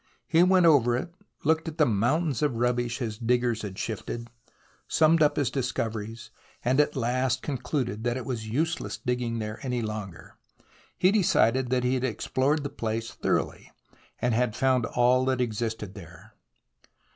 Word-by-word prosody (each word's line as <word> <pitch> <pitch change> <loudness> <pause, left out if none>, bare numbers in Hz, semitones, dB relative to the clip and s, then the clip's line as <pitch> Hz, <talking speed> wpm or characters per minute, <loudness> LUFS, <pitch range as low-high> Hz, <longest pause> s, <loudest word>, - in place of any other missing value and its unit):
He 165 +1 +4
went 180 0 +5
over 125 -7 +5
it, 170 +7 -5 0.3
looked 160 +2 +2
at 160 0 -6
the 150 - +5
mountains 130 - +1
of 145 -5 +1
rubbish 120 0 0
his 110 -4 -4
diggers 120 -1 +1
had 95 -3 -6
shifted, 115 +2 -5 0.6
summed 160 +1 +4
up 150 - +4
his 135 -4 0
discoveries, 115 -3 -3 0.3
and 130 +3 +2
at 150 0 +2
last 130 +1 0
concluded 125 -5 -2
that 120 +1 0
it 130 - -5
was 115 -4 -4
useless 160 +9 -1
digging 125 -3 -2
there 110 -1 -4
any 125 -3 -2
longer. 105 -5 -7 0.6
He 185 - +4
decided 130 - +3
that 125 0 +1
he 125 +1 +1
had 130 -1 -1
explored 130 +5 0
the 140 - -3
place 115 -2 -3
thoroughly, - - -2 0.5
and 120 0 0
had 120 -1 +1
found 130 -2 +2
all 125 +1 +3
that 130 -1 +1
existed 110 -4 -2
there. 95 -6 -13
125 Hz, 160 wpm, -27 LUFS, 115-140 Hz, 0.6 s, went